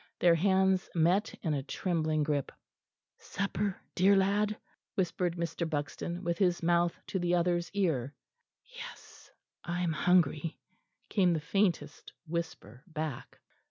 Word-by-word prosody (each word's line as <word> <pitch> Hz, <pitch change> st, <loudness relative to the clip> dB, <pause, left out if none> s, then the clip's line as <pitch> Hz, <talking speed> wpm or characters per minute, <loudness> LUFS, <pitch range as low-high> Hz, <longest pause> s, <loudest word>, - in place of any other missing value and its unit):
Their 175 Hz, -1 st, +5 dB
hands 190 Hz, +2 st, +3 dB
met 180 Hz, +6 st, +3 dB
in 160 Hz, -4 st, +1 dB
a 140 Hz, -, 0 dB
trembling 155 Hz, +1 st, 0 dB
grip. 145 Hz, -2 st, -1 dB, 0.7 s
"Supper, 200 Hz, 0 st, -2 dB
dear 195 Hz, +2 st, +5 dB
lad?" 205 Hz, +2 st, +2 dB, 0.4 s
whispered 180 Hz, -2 st, 0 dB
Mr. 170 Hz, 0 st, -2 dB
Buxton, 165 Hz, +4 st, -3 dB
with 170 Hz, -1 st, -1 dB
his 180 Hz, -3 st, +2 dB
mouth 170 Hz, 0 st, +2 dB
to 190 Hz, -, -2 dB
the 175 Hz, 0 st, +2 dB
other's 175 Hz, 0 st, +1 dB
ear. 145 Hz, -9 st, 0 dB, 0.5 s
"Yes, -, -, -11 dB, 0.3 s
I 175 Hz, +1 st, -2 dB
am 170 Hz, -3 st, +1 dB
hungry," 165 Hz, -2 st, +2 dB, 0.5 s
came 185 Hz, -4 st, +3 dB
the 160 Hz, -, 0 dB
faintest 155 Hz, -3 st, -1 dB
whisper 155 Hz, -, -5 dB
back. 155 Hz, -5 st, -5 dB
175 Hz, 125 wpm, -31 LUFS, 155-190 Hz, 0.7 s, Their